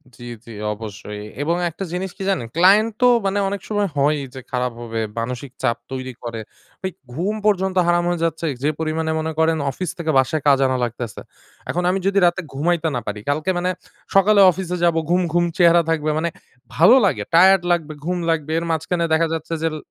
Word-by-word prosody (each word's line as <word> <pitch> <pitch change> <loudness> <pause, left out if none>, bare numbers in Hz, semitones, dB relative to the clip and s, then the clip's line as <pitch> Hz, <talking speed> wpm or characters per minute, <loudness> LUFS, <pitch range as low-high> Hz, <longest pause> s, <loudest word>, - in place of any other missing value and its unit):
জ্বি, 120 +2 -10 0.2
জ্বি 115 - -10 0.2
অবশ্যই। 105 -1 -8 0.2
এবং 165 +3 +1
একটা 170 +4 -7
জিনিস 185 +1 -3
কি 195 - -5
জানেন? 175 -12 -1
ক্লায়েন্ট 200 +6 +5
তো 250 - +6 0.2
মানে 195 +1 +1
অনেক 200 -1 -4
সময় 205 -2 0
হয়ই 145 +1 +2
যে 130 - -7
খারাপ 125 -1 -1
হবে, 115 -1 -4 0.2
মানসিক 125 +3 -5
চাপ 115 - +1
তৈরি 130 -1 -5
করে। 115 -1 -5 0.4
ভাই 190 - -3 0.2
ঘুম 185 +10 -1
পর্যন্ত 190 -2 +1
হারাম 175 0 +3
হয়ে 175 -2 -2
যাচ্ছে। 165 0 -2 0.2
যে 150 - +3
পরিমাণে 160 0 -1
মনে 160 0 -2
করেন 160 0 +3
অফিস 180 +6 -4
থেকে 165 -2 -1
বাসায় 135 +4 +2
কাজ 140 -1 +5
আনা 130 0 0
লাগতেছে। 120 -2 -5 0.5
এখন 180 - -1
আমি 190 +2 +1
যদি 200 0 +3
রাতে 175 +2 +2
ঘুমাইতে 165 +3 0
না 120 - -2
পারি, 105 0 -3
কালকে 155 +5 -1
মানে 180 +1 0 0.5
সকালে 200 +1 +6
অফিসে 180 -1 -4
যাবো, 170 -1 +3
ঘুম, 180 +1 +3
ঘুম 175 0 +3
চেহারা 170 -1 +6
থাকবে, 155 -1 0
মানে 170 +2 0 0.5
ভালো 170 - +7
লাগে? 195 - 0
টায়ার্ড 190 +2 +6
লাগবে, 160 -3 0
ঘুম 180 +1 -1
লাগবে। 155 -2 -1
এর 170 - -5
মাঝখানে 170 +2 -1
দেখা 165 +1 +3
যাচ্ছে 165 +1 -4
যে - - +2
l - - -5
165 Hz, 200 wpm, -21 LUFS, 140-180 Hz, 0.5 s, ভালো